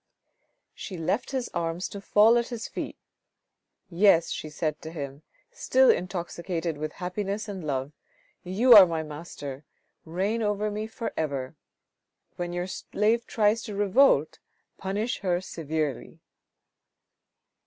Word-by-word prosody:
She 185 - -7
left 170 +8 -1
his 260 -3 -2
arms 170 +1 -2
to 200 - -8
fall 215 +3 +5
at 235 - -2
his 235 -3 -5
feet. - - -6 0.5
" - - -57 0.2
Yes," 175 -2 +4
she 155 - -4
said 155 0 -3
to 160 - -7
him, 140 -3 -6 0.3
still 260 0 +4
intoxicated 175 -2 -3
with 155 0 -4
happiness 200 +3 -3
and 200 -2 -5
with 160 - -7
love, 135 0 -2 0.3
" - - -39
you 245 +2 +7
are 200 -4 +11
my 165 -1 -2
master, 145 -3 -8 0.4
reign 195 +8 -1
over 210 0 0
me 215 +1 -3
for 225 +1 -5
ever. 140 -2 -3 0.8
When 175 -1 -4
your 175 0 -2
slave 215 +4 0
tries 215 +1 +2
to 210 -3 -6
revolt, 205 - +3 0.4
punish 205 +6 -2
her 180 -3 0
severely." 155 -6 -4
185 Hz, 140 wpm, -27 LUFS, 160-210 Hz, 0.8 s, are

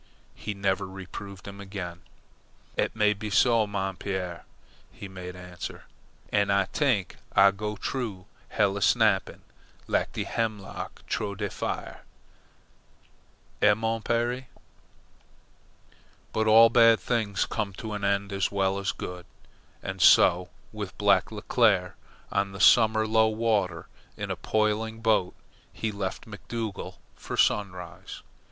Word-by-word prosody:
He 105 - -6
never 100 0 0
reproved 95 0 -9
him 100 0 -8
again. 95 -3 -6 0.7
"Eet - - -1
may 105 -1 +3
be 105 +1 -6
so, 115 +1 +4
mon 95 -2 -3
pere," 90 -3 -4 0.5
he 100 - -9
made 90 -1 -8
answer. 90 -1 -8 0.5
"An' 100 -1 +2
Ah 100 0 +3
t'ink 125 - +1 0.2
Ah 100 0 +7
go 105 +1 -4
troo 105 -5 -4 0.2
hell 100 -1 +1
a - - -4
snappin', 110 -5 +2 0.4
lak - - 0
de - - -2
hemlock 110 -4 -4
troo 100 -2 -2
de 105 -1 -3
fire. - - -4 1.6
Eh, 105 0 +6
mon 115 +1 -1
pere?" 120 +3 -1 1.9
But 110 0 +1
all 115 +1 +8
bad 115 -2 +6
things 110 -5 0
come 105 -3 -3
to 110 +3 -6
an 105 -1 -4
end 100 0 0
as 95 -1 0
well 95 -1 +1
as 100 - -1
good, 90 -1 -7 0.6
and - - -5
so 90 +1 +6 0.2
with - - -6
Black - - +3
Leclere. 100 -7 +2 0.4
On 100 0 0
the 100 - -8
summer 110 -1 +5
low 110 0 +4
water, 110 -7 0 0.3
in - - -4
a - - -1
poling 110 +1 -1
boat, 110 -5 +2 0.4
he 110 - -3
left 100 -2 -4
McDougall 110 0 -6 0.2
for - - -6
Sunrise. 95 -3 -1
100 Hz, 135 wpm, -27 LUFS, 95-110 Hz, 1.9 s, all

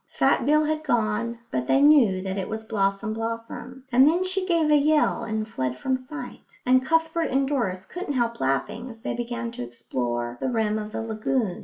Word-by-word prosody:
Fat - - +1
Bill 305 +1 +4
had 310 0 -1
gone, 235 -2 0
but 125 -1 -2
they - - +4
knew 265 -11 +5
that 190 -1 -3
it 195 -2 -3
was 220 0 -4
Blossom 200 0 -1
blossom, 230 +3 -5
and 260 +3 +6
then 345 +4 +3
she 370 0 -2
gave 330 -4 +2
a - - +7
yell 300 +1 +3
and 220 0 -3
fled 130 - -3
from 260 - 0
sight; 260 +4 -9
and 255 +1 +4
Cuthbert 325 +2 +1
and 270 +1 +1
Doris 195 -10 -1
couldn't 355 - -5
help 235 -3 0
laughing 205 - -1
as 225 -1 -12
they - - -2
began 240 0 -4
to 235 - -6
explore 120 0 -3
the - - 0
rim 220 -3 0
of 210 0 -6
the 225 - -3
lagoon. 220 -2 -1
235 Hz, 200 wpm, -25 LUFS, 210-280 Hz, -, a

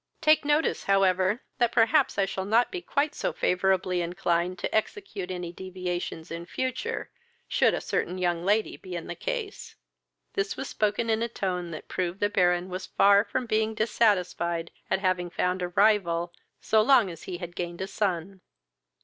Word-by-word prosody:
Take 310 -1 +4
notice, 295 +2 +1
however, 195 +2 +2 0.2
that 240 -1 +3
perhaps 245 +4 +3
I 200 - +3
shall 190 0 -4
not 225 +5 +2
be 370 -2 -4
quite 295 -3 0
so - - -2
favourably 185 -1 +1
inclined 175 +1 -1
to 175 - -3
execute 220 - -2
any 175 -2 -5
deviations 180 -3 -5
in 170 +1 -6
future, 260 - -3 0.4
should - - +3
a - - -3
certain 180 - -2
young 175 -2 0
lady 210 +3 +1
be 185 -2 -8
in 170 - -5
the - - -5
case." - - -5 0.6
This 195 0 -2
was 270 - -4
spoken 215 +2 0
in 220 0 +1
a 235 - +1
tone 180 -6 -3
that 155 -2 -8
proved 180 +1 -3
the 205 0 +1
Baron 180 -2 +2
was 185 0 -5
far 200 0 +5
from 255 +2 -3
being 220 -1 0
dissatisfied 180 -6 +1 0.2
at - - +2
having 185 -2 0
found 180 +1 -1
a 180 - 0
rival, 175 -3 +2 0.3
so 220 0 +3
long 235 -5 +5
as 165 - -10
he 180 - -5
had 175 -1 -8
gained 175 -1 -4
a - - -1
son. 190 -2 -2
190 Hz, 175 wpm, -27 LUFS, 175-220 Hz, 0.6 s, far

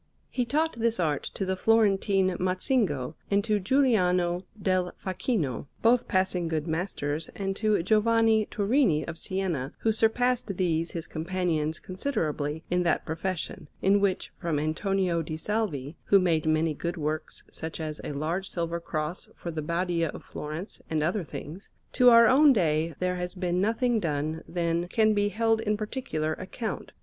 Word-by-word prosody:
He 250 - 0
taught 305 0 0
this 230 -1 +1
art 150 -5 +1
to 195 - -2
the 190 0 0
Florentine 195 -2 +3
Mazzingo 185 - 0 0.2
and 200 0 +2
to 215 -1 +1
Giuliano 185 -7 +2
del 185 -2 0
Facchino, 180 - -2 0.2
both 235 +1 +4
passing 185 -2 +1
good 155 -2 -1
masters, 160 -3 -2
and 195 -1 -2
to 215 -5 +2
Giovanni 220 +1 +3
Turini 205 - +2
of 165 -1 -6
Siena, 180 -9 -1
who 225 - +3
surpassed 225 -2 +1
these 165 -2 +1
his 165 -2 -4
companions 160 -2 -1
considerably 160 - -2
in 180 0 +3
that 170 -3 +1
profession, 165 -1 -4 0.2
in 195 +2 +5
which, 195 -2 0
from 170 -5 -1
Antonio 170 +3 0
di 155 0 -5
Salvi 160 -7 -2
who 200 - +6
made 165 -4 +2
many 155 0 +2
good 170 +4 -4
works, 155 0 -3
such 160 +1 -6
as 155 -1 -4
a - - -4
large 165 +7 -2
silver 170 -1 -2
Cross 155 +1 -4
for 170 - -6
the 160 -1 -3
Badia 170 +1 0
of - - -8
Florence, 155 +7 -7
and 155 -2 0
other 180 +5 0
things 170 +4 -8 0.2
to 250 -1 +6
our 230 -1 +8
own 275 +4 +6
day, 160 - +1
there 180 0 -1
has 180 +1 -4
been 180 -1 0
nothing 230 +3 +1
done 155 -2 -2
than 170 0 -1
can 215 +3 +3
be 205 0 +2
held 225 +1 +1
in 210 -1 0
particular 205 -9 -2
account. 205 +6 -5
180 Hz, 160 wpm, -27 LUFS, 160-215 Hz, 0.2 s, our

